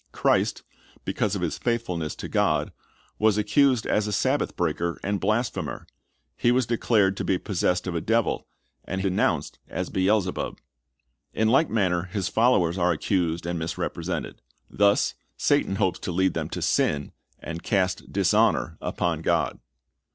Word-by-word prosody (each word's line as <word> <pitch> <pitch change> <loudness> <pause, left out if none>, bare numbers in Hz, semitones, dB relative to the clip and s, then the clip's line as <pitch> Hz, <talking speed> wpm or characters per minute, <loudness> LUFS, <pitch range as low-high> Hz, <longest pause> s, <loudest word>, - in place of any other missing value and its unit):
Christ, - - +1 0.4
because 105 -1 0
of 95 - -3
His 85 - -2
faithfulness 90 -10 -2
to - - -6
God, - - +1 0.5
was 110 -1 +3
accused 130 +2 +3
as 105 0 +1
a - - -2
Sabbath 130 +7 0
breaker 85 0 -1
and 100 0 -1
blasphemer. 110 +5 -1 0.5
He 120 - +2
was 125 0 +2
declared 110 -4 +2
to - - -2
be 95 - +1
possessed 90 -2 0
of 90 - -3
a 85 - -1
devil, 115 0 0 0.4
and 95 - -4
was 95 - -2
denounced 95 -1 0
as - - -4
Beel/.cbub. 95 0 0 0.8
In 110 0 +2
like 135 +6 +4
manner 95 -5 +1
His 95 -1 -3
followers 95 -6 +3
are 90 0 +3
accused 85 0 0
and 85 0 -2
misrepresented. 80 +1 -4 0.3
Thus 100 0 +3 0.2
Satan 95 - +2
hopes 95 -3 0
to 95 - -4
lead 95 +2 +2
them - - -3
to - - -4
sin, 75 -1 +1 0.3
and 85 +1 -7
cast 95 -3 -1
dishonor - - +2
upon - - -1
God. - - 0
95 Hz, 150 wpm, -25 LUFS, 90-110 Hz, 0.8 s, like